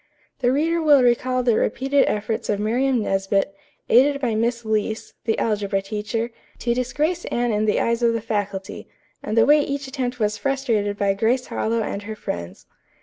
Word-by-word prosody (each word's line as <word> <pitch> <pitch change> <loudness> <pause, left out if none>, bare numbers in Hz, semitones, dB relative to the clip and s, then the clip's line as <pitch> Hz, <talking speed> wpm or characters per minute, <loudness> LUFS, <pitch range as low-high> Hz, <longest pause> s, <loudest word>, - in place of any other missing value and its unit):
The 245 -1 +2
reader 325 +5 +1
will 290 -4 +5
recall 250 +1 +2
the 240 -2 +3
repeated 270 +4 +2
efforts 215 +1 -2
of 205 - +1
Miriam 240 +3 +1
Nesbit, 195 0 0 0.3
aided 280 +4 +4
by 245 -5 0
Miss 235 +2 0
Leece, 220 0 -2
the 225 - +1
algebra 205 -3 0
teacher, 215 +3 -3 0.3
to 235 - 0
disgrace 300 +8 -1
Anne 240 0 0
in 210 +1 +1
the 210 - +2
eyes 235 +1 0
of 235 -1 +3
the 230 - 0
faculty, 205 -3 -4 0.3
and 215 - -3
the 225 - +6
way 295 +3 +6
each 280 -1 -3
attempt 255 -2 -4
was 215 0 0
frustrated 230 -7 0
by 200 -1 +2
Grace 235 +5 +1
Harlowe 225 0 -1
and 200 - -4
her 215 +1 -6
friends. 85 - -6
230 Hz, 180 wpm, -22 LUFS, 210-255 Hz, 0.3 s, the